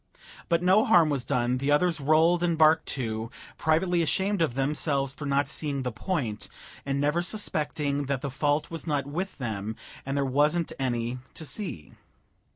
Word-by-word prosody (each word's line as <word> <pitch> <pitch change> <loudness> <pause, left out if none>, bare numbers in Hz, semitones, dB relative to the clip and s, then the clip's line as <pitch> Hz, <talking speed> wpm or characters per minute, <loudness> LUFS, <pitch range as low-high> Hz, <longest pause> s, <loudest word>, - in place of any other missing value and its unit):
But 170 0 +2
no 190 +4 +5
harm 170 -9 +5
was 135 -4 -1
done; 125 +1 0
the 140 +2 -1
others 165 +3 +3
rolled 160 +4 +4
and 170 -2 +1
barked 155 0 +5
too, 115 -3 -2 0.3
privately 170 +3 +2
ashamed 190 +4 0
of 150 -7 +1
themselves 140 0 0
for 145 +1 -6
not 140 0 +2
seeing 140 -2 -2
the 125 - -2
point, 120 - -3 0.4
and 140 0 0
never 150 +4 +1
suspecting 150 -7 -1
that 135 -1 -2
the 140 - -4
fault 145 +3 0
was 165 0 -6
not 145 -3 0
with 180 +7 -4
them 110 -4 -4 0.3
and 135 +1 -3
there 140 - +1
wasn't 150 +5 +1
any 120 -1 -1 0.2
to 160 - -6
see. 155 - -4
145 Hz, 170 wpm, -27 LUFS, 135-165 Hz, 0.4 s, no